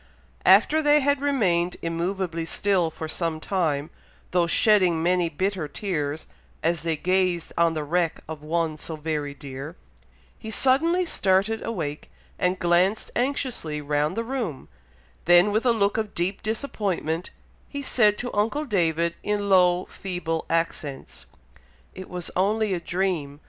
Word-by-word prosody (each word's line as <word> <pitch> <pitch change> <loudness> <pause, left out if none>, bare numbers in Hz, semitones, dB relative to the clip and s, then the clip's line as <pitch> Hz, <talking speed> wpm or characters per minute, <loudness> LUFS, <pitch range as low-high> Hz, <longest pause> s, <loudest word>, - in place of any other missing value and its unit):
After 315 +1 +6
they 295 0 +4
had 285 0 +1
remained 185 -12 +1
immoveably 170 0 -2
still 185 -1 +1
for 160 0 -6
some 165 0 -2
time, 155 -5 -1 0.4
though 175 -1 +2
shedding 180 -3 +3
many 175 -1 +2
bitter 185 +1 -2
tears, 155 -4 -3 0.4
as 165 -1 +1
they 165 0 0
gazed 180 +1 0
on 165 -1 +2
the 155 - -2
wreck 165 +2 0
of 155 -1 -7
one 160 0 -1
so 160 - -5
very 150 -2 -3
dear, 135 -2 -8 0.6
he 220 - -7
suddenly 315 - +2
started 200 - +1
awake, 155 -10 -4 0.3
and 180 +1 +1
glanced 180 +4 +2
anxiously 245 - -1
round 150 +4 -1
the 230 - 0
room, 230 - -4 0.6
then 175 +4 +6
with 220 +4 +1
a - - +6
look 205 -2 +1
of 215 -2 -3
deep 185 +3 -1
disappointment, 200 - -2 0.4
he 285 -1 -5
said 210 -5 +3
to 245 - -4
uncle 230 +9 0
David, 170 - +1
in 205 -1 -1
low, 180 -1 +4
feeble 175 -4 -4
accents, 165 -4 -3 0.7
"It 185 0 -9
was 180 -2 -6
only 210 +2 +1
a 180 - -1
dream! 170 -5 -2
180 Hz, 145 wpm, -25 LUFS, 160-210 Hz, 0.7 s, After